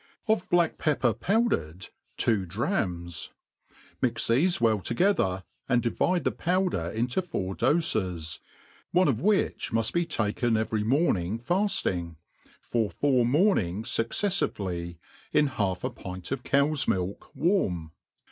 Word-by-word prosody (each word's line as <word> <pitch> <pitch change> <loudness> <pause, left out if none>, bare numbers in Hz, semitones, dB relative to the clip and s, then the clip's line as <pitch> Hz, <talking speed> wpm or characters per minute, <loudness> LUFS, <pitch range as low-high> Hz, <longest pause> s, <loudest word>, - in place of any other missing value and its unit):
Of 215 -4 +1
black 175 -2 +2
pepper 130 -7 +1
powdered, 105 - -1 0.3
two 110 -5 +2
drachms 90 - -2 0.7
Mix - - +1
thefe 165 +10 +3
well 110 -3 +3
together, 115 - +1 0.3
and 125 -2 +2
divide 175 +9 +1
the - - +1
powder 180 - 0
into 120 - -1
four 95 - -4
dofe^ 95 - 0 0.5
one 180 +1 +4
of 125 -4 0
which 205 +2 +1
muft 115 -1 +1
be 170 -1 +1
taken 115 -3 0
every 110 -1 -1
morning 110 - +1
failing, 115 - 0 0.5
for 115 -3 0
four 125 - +2
mornings 120 - +1
fucceffivelyi 100 - -1 0.4
in 150 - +4
half 100 -9 -2
a - - -1
pint 90 +1 -8
of 135 -2 -2
cow's 140 +3 +2
milk 95 +1 -2
warm. 95 - 0
115 Hz, 125 wpm, -27 LUFS, -, 0.7 s, one